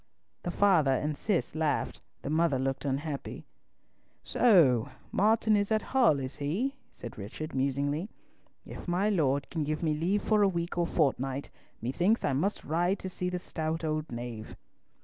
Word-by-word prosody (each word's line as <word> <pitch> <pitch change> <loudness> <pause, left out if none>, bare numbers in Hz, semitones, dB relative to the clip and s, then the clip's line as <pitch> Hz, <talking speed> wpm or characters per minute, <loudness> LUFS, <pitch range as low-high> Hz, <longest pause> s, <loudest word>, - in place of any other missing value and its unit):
The - - -4
father 175 -7 +4
and 150 +3 -1
Cis 195 +2 -1
laughed, 155 -2 -1 0.2
the 140 - -3
mother 160 -3 +2
looked 135 +2 -2
unhappy. 140 +1 -3 0.8
"So 160 - +4 0.2
Martin 220 +1 +3
is 205 +1 +1
at 215 0 +2
Hull, 240 - +5
is 130 0 -5
he?" 190 - -1 0.2
said 120 -2 -10
Richard, 155 +11 -6
musingly. 140 - 0 0.6
"If - - -9
my 180 +4 +1
Lord 145 -8 +1
can 160 -3 -1
give 155 +2 -2
me 155 -2 +2
leave 180 +7 0
for 215 -1 +3
a 200 - +6
week 170 -2 -2
or 175 -1 +1
fortnight, 135 -3 0 0.3
methinks 175 - +1
I 140 - +1
must 190 +10 0
ride 175 +5 +1
to 185 - -6
see 180 0 -3
the 180 - -2
stout 160 -2 -3
old 155 -1 -2
knave." 120 -2 -6
160 Hz, 165 wpm, -30 LUFS, 140-185 Hz, 0.8 s, a